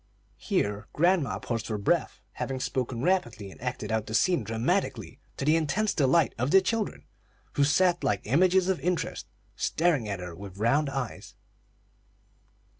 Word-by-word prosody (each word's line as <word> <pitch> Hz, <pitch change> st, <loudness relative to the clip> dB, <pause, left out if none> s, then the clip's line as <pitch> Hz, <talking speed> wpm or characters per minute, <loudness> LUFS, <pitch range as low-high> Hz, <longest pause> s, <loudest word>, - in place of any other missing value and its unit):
'" -, -, -36 dB, 0.2 s
Here 100 Hz, 0 st, 0 dB
grandma 170 Hz, -4 st, +2 dB
paused 115 Hz, -2 st, -4 dB
for 110 Hz, -, -2 dB
breath, 100 Hz, -, 0 dB
having 135 Hz, -1 st, -4 dB
spoken 125 Hz, -1 st, -2 dB
rapidly 120 Hz, -, 0 dB
and -, -, -15 dB
acted 125 Hz, -3 st, -4 dB
out 110 Hz, -1 st, -1 dB
the 110 Hz, -, -3 dB
scene 180 Hz, +8 st, +3 dB
dramatically, 115 Hz, +1 st, -1 dB, 0.2 s
to -, -, -3 dB
the 155 Hz, +2 st, +4 dB
intense 170 Hz, +7 st, +1 dB
delight 145 Hz, +2 st, +3 dB
of 125 Hz, +3 st, 0 dB
the 195 Hz, -, +7 dB
children, 210 Hz, +3 st, -2 dB, 0.5 s
who 145 Hz, -, +2 dB
sat 175 Hz, +5 st, +3 dB
like 100 Hz, -, +1 dB
images 180 Hz, -, +3 dB
of 190 Hz, -2 st, +1 dB
interest, 180 Hz, 0 st, -2 dB, 0.3 s
staring 150 Hz, -10 st, +1 dB
at 100 Hz, -2 st, -3 dB
her 90 Hz, -1 st, -7 dB
with 95 Hz, +2 st, -10 dB
round 135 Hz, +8 st, +2 dB
eyes. 135 Hz, -4 st, -5 dB
135 Hz, 160 wpm, -28 LUFS, 110-175 Hz, 0.5 s, the